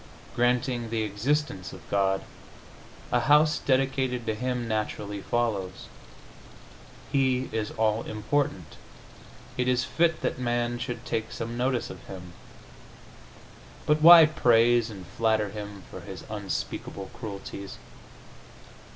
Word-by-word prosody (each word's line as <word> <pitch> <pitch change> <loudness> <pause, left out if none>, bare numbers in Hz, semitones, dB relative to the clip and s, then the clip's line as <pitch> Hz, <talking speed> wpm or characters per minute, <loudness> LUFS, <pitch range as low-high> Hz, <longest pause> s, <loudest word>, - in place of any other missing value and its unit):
Granting 120 -1 +1
the 115 -1 -1
existence 105 - -1
of 95 -3 -12
God, 95 -1 +1 0.9
a - - +3
house 150 +1 +4
dedicated 130 -2 0
to 110 - 0
Him 125 +1 -2
naturally 105 -2 -3
follows. 105 -5 -2 1.3
He 130 -2 +1
is 110 -1 -2
all 110 0 +2
important; 110 - -2 0.8
it 125 0 0
is 125 0 +2
fit 165 +5 +1
that - - -2
man 120 -1 -1
should 120 -1 -5
take 110 0 -2
some 115 +1 -5
notice 120 -1 -1
of - - -11
Him. 90 -2 -9 1.5
But 150 0 +2
why 165 0 +11
praise 120 -6 +3
and 95 -4 -9
flatter 110 +2 0
Him 105 -1 -8
for - - -8
His - - -9
unspeakable 95 -1 -4
cruelties? 100 -2 -7
120 Hz, 115 wpm, -27 LUFS, 105-130 Hz, 1.5 s, why